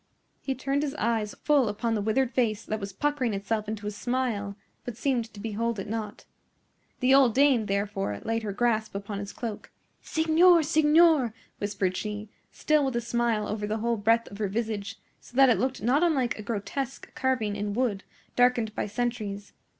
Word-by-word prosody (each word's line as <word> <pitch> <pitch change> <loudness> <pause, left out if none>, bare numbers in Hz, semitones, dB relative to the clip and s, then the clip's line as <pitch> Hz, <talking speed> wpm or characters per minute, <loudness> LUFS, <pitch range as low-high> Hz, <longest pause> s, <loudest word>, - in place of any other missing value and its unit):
He 270 - -2
turned 275 +2 -1
his 295 -1 -2
eyes 225 -4 -1
full 285 -6 +3
upon 225 +3 -1
the 215 - 0
withered 235 +5 +1
face 225 -5 0
that 215 - -3
was 200 -1 -5
puckering 255 0 -1
itself 210 +2 -2
into 215 -1 -5
a 210 - -2
smile, 215 -3 -2 0.3
but 245 -3 -7
seemed 240 -3 -1
to 205 - -12
behold 225 +2 -2
it 195 - -5
not. 215 -1 -5 0.8
The 255 +1 +4
old 265 -5 +5
dame, 265 -6 +4
therefore, 195 - -2
laid 225 0 0
her 210 -2 -3
grasp 220 0 0
upon 200 0 -4
his 200 0 -6
cloak. 225 -4 -6 0.3
"Signor! 325 +2 +4
signor!" 305 -5 +4 0.2
whispered 200 -3 -1
she, 210 +1 -4 0.2
still 305 -1 +2
with 265 -3 -1
a - - +2
smile 235 -2 0
over 210 -1 -3
the 215 +1 -1
whole 235 +1 0
breadth 225 +3 +2
of 200 - -10
her 210 - 0
visage, 215 0 -3 0.2
so - - -18
that 270 -1 +7
it - - +2
looked 260 -3 -1
not 260 +6 +3
unlike 280 -9 +2
a - - -4
grotesque 235 +5 -4
carving 255 -6 0
in 205 0 -3
wood, 225 -6 0 0.3
darkened 245 -3 +3
by - - -2
centuries. 210 -3 -3
225 Hz, 185 wpm, -27 LUFS, 210-260 Hz, 0.8 s, that